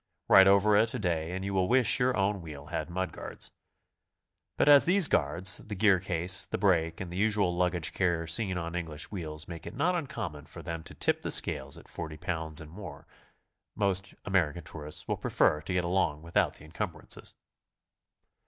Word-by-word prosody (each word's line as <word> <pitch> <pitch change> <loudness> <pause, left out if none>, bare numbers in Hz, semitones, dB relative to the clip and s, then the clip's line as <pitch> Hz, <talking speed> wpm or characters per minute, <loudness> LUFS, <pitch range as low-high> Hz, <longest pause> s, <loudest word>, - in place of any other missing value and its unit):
Ride 95 0 +8
over 100 +2 +5
it 115 +2 +2
a - - -1
day 85 -5 -1
and 95 +1 -4
you 100 - -3
will 95 -1 +1
wish 125 +1 +4
your 125 0 +1
own 100 0 0
wheel 75 -3 -9
had 80 0 -3
mud 90 0 -3
guards. - - -7 1.1
But - - +2
as 145 -1 +9
these 180 -1 +5
guards, 85 +6 +2
the 105 - -7
gear 100 -1 +4
case, 90 0 -1
the - - -3
brake 85 -5 +1
and 95 -2 -6
the - - -5
usual 100 -3 +1
luggage 90 -3 +1
carrier 85 -3 0
seen 95 +3 0
on 85 -1 -4
English 80 -3 -5
wheels 80 -6 -5
make 85 -2 -8
it - - -8
not 180 +2 +1
uncommon 110 - -5
for - - -11
them 85 -1 -5
to - - -10
tip - - 0
the - - -4
scales 70 +1 +1
at - - -15
40 80 -1 -7
pounds 80 -3 0
and 80 -1 -10
more, 90 -6 -10 0.7
most 95 -2 -1
American 85 -4 0
tourists 75 0 -6
will - - -1
prefer 75 - +1
to 80 - -4
get 90 -1 +1
along 85 -4 0
without 85 +1 +1
the 75 - -14
encumbrances. 80 - -3
90 Hz, 190 wpm, -29 LUFS, 80-100 Hz, 1.1 s, as